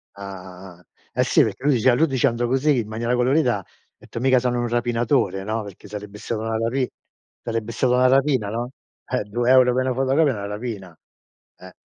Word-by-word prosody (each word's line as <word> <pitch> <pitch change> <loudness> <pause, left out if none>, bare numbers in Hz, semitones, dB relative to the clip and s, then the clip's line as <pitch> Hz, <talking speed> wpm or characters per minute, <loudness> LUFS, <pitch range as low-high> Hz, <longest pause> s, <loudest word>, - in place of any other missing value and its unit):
Ah, 100 - -10 0.2
ah, 90 -1 -12
ah. - - -22 0.3
Eh - - +2
sì - - +4
perché 130 - -4
lui 145 - +4
diceva 120 +1 +3
lui 160 +5 +3
dicendo 120 -3 +1
così 135 +1 +2
in 110 - -3
maniera 115 +3 -1
colorita, 125 -3 +2
ha 90 - -14 0.3
detto: - - -8
"Mica 130 0 +4
sono 120 -1 -1
un 120 - -1
rapinatore." 120 -4 0
No, 110 +1 -2
perché 100 +1 -12
sarebbe 105 0 -8
stata 110 +1 -4
una 110 0 -2
rapi 125 +3 -1 0.5
sarebbe 115 -1 -3
stata 125 +2 +1
una 130 0 +4
rapina, 130 -5 +2
no, 120 +3 -3 0.4
eh - - -1
2 120 +4 -1
euro 125 -1 +6
per 130 - +1
una 130 -1 0
fotocopia 135 +3 +2
è - - -6
una 100 0 -5
rapina. 105 -5 -6 0.6
Eh. - - -12
120 Hz, 210 wpm, -22 LUFS, 105-130 Hz, 0.6 s, euro